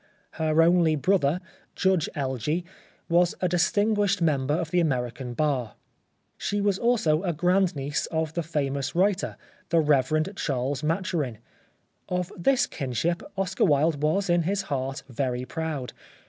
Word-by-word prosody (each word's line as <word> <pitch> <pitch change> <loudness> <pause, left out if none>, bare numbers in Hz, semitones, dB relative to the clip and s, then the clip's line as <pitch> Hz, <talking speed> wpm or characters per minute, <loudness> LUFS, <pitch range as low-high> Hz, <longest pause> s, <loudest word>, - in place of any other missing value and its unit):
Her 160 0 +2
only 170 -2 +4
brother, 170 0 +2 0.4
Judge 190 -4 +2
Elgee, 140 +4 -1 0.4
was 175 0 +3
a 180 - +1
distinguished 205 +3 +2
member 145 -4 +1
of 165 -2 -3
the 180 - +3
American 125 -5 -1
bar. 135 -7 -1 0.6
She 205 - -2
was 200 -1 +1
also 215 -10 +2
a 180 -3 -1
grand 180 +3 +2
niece 140 +1 -2
of 160 -1 -2
the 170 - -1
famous 140 -3 -2
writer, 195 +2 +1 0.3
the 170 - +3
Rev. 150 +2 +2
Charles 135 0 -1
Maturin. 160 - -1 0.7
Of 180 0 -2
this 245 +8 +2
kinship 155 - -2 0.2
Oscar 190 0 +1
Wilde 145 0 +2
was 165 +7 +1
in 175 -1 +3
his 195 +4 -1
heart 135 +1 -3
very 125 -1 -2
proud. 155 -4 -4
160 Hz, 140 wpm, -26 LUFS, 140-180 Hz, 0.7 s, only